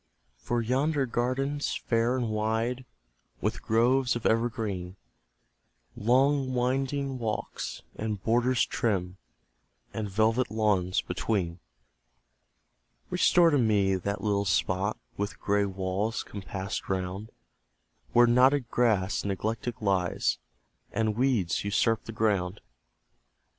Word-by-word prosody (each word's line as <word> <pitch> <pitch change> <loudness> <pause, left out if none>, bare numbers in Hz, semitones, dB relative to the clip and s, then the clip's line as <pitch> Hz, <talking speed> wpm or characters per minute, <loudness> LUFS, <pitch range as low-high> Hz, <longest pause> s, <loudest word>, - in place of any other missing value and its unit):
For 120 - -1
yonder 135 +4 +1
garden, 130 +4 -1
fair 120 -3 0
and 120 -3 -1
wide, 115 +4 -1 0.5
With - - -2
groves 125 +3 +2
of 120 - -5
evergreen, 110 -6 -1 1.0
Long 130 +3 +2
winding 135 +2 -1
walks, 110 -2 -4
and 110 -2 -3
borders 125 +2 +2
trim, 95 -6 -1 0.8
And 110 -2 -3
velvet 110 +5 +2
lawns 105 -4 +1
between; 90 -6 -2 1.5
Restore 170 -2 +5
to 145 - +3
me 105 -4 +3
that 100 +2 -2
little 100 -1 +1
spot, 95 +3 0 0.2
With 100 +1 -3
gray 100 0 +1
walls 95 +4 -2
compassed 95 0 -5
round, 95 +3 -3 0.8
Where 120 0 +6
knotted 125 +1 +4
grass 105 -6 +1
neglected 110 +4 -2
lies, 95 -4 +1 0.5
And 110 -2 0
weeds 120 -8 +1
usurp 110 +2 +1
the - - -6
ground. 105 -4 0
110 Hz, 105 wpm, -28 LUFS, 100-125 Hz, 1.5 s, Where